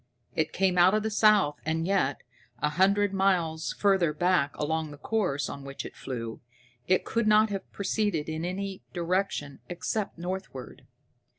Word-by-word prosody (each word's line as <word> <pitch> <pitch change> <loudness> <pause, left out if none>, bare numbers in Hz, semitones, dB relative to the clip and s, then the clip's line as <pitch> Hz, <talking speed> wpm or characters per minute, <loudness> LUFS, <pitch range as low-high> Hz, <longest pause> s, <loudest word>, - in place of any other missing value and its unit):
It 155 0 0
came 185 -2 +2
out 185 +4 +6
of 215 - +1
the 220 - -1
south, 205 -8 +4
and 160 +1 -1
yet, 180 -8 +1 0.3
a 150 +4 0
hundred 195 +5 +3
miles 175 -5 +1
further 190 -6 +3
back 170 -3 +1
along 160 +1 -1
the 145 - -10
course 180 -5 -1
on 140 - -7
which 140 0 -6
it - - -9
flew, 115 -4 -6 0.5
it 185 0 +2
could 230 -1 0
not 215 0 +5
have 195 -1 -5
proceeded 200 -6 -1
in 160 0 -3
any 190 +2 -4
direction 175 -5 -1
except 185 +4 -3
northward. 175 -6 -6
180 Hz, 160 wpm, -28 LUFS, 150-195 Hz, 0.5 s, out